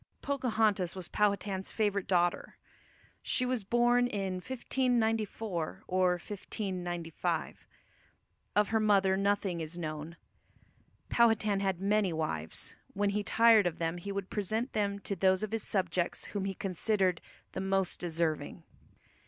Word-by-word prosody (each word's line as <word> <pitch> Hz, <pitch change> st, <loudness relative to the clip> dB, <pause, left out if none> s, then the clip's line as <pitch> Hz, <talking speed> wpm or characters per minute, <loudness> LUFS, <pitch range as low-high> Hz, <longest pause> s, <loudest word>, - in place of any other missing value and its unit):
Pocahontas 220 Hz, -9 st, +1 dB
was 185 Hz, -2 st, -6 dB
Powhatan's 200 Hz, -2 st, 0 dB
favourite 205 Hz, -3 st, 0 dB
daughter. 175 Hz, -2 st, +1 dB, 0.6 s
She 250 Hz, -, 0 dB
was 250 Hz, -4 st, -1 dB
born 240 Hz, +3 st, +3 dB
in 195 Hz, -5 st, -2 dB
1594 225 Hz, -6 st, -1 dB
or 185 Hz, 0 st, +3 dB
1595. 180 Hz, -3 st, -4 dB, 0.9 s
Of 210 Hz, 0 st, +3 dB
her 220 Hz, -, +2 dB
mother 195 Hz, -3 st, +4 dB
nothing 195 Hz, -3 st, 0 dB
is 160 Hz, +2 st, -5 dB
known. 155 Hz, 0 st, -5 dB, 0.9 s
Powhatan 225 Hz, -4 st, +3 dB
had 190 Hz, -3 st, 0 dB
many 200 Hz, -1 st, +2 dB
wives; 80 Hz, -, -2 dB, 0.2 s
when 205 Hz, 0 st, +1 dB
he 210 Hz, +1 st, 0 dB
tired 220 Hz, -1 st, +5 dB
of 170 Hz, -, -3 dB
them 165 Hz, +1 st, -1 dB
he 200 Hz, +3 st, -5 dB
would 195 Hz, -1 st, -4 dB
present 220 Hz, +5 st, -1 dB
them 200 Hz, -2 st, 0 dB
to 200 Hz, -, -2 dB
those 190 Hz, +2 st, +3 dB
of 215 Hz, -, -3 dB
his 225 Hz, 0 st, -1 dB
subjects 185 Hz, -3 st, -1 dB
whom 200 Hz, -2 st, -1 dB
he 195 Hz, -1 st, -2 dB
considered 190 Hz, -1 st, 0 dB, 0.3 s
the -, -, -4 dB
most 190 Hz, -1 st, +1 dB
deserving. 165 Hz, -2 st, -2 dB
195 Hz, 130 wpm, -31 LUFS, 180-215 Hz, 0.9 s, tired